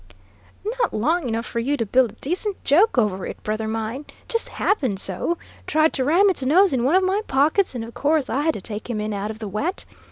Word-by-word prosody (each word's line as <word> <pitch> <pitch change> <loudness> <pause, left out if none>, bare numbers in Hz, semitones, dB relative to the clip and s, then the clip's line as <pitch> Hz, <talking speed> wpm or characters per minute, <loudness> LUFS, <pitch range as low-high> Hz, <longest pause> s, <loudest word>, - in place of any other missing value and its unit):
"Not 470 +1 -1
long 310 +8 +1
enough 230 +1 -2
for 235 - -3
you 280 +5 0
to 230 - -1
build 245 +2 +3
a - - -24
decent 375 +7 -2
joke 345 - +4
over 205 -5 +1
it, - - -8
brother 215 +1 -2
mine. 225 +6 -4 0.2
Just 460 -1 -1
happened 260 - 0
so. 195 - -1 0.3
Tried 315 +1 +3
to 265 - 0
ram 340 +9 +4
its 360 - -3
nose 335 +7 +4
in 245 -2 +1
one 280 +8 +3
of 380 - +4
my 385 +3 +1
pockets, 295 +5 +2
and 235 - -3
of 230 +1 -9
course 295 -1 +1
I 275 - 0
had 320 +1 +1
to - - -6
take 215 +3 -7
him 225 -3 -2
in 210 0 -2
out 200 +1 -3
of 220 - -6
the 220 -1 -6
wet. 285 - -2
265 Hz, 235 wpm, -22 LUFS, 220-340 Hz, 0.3 s, joke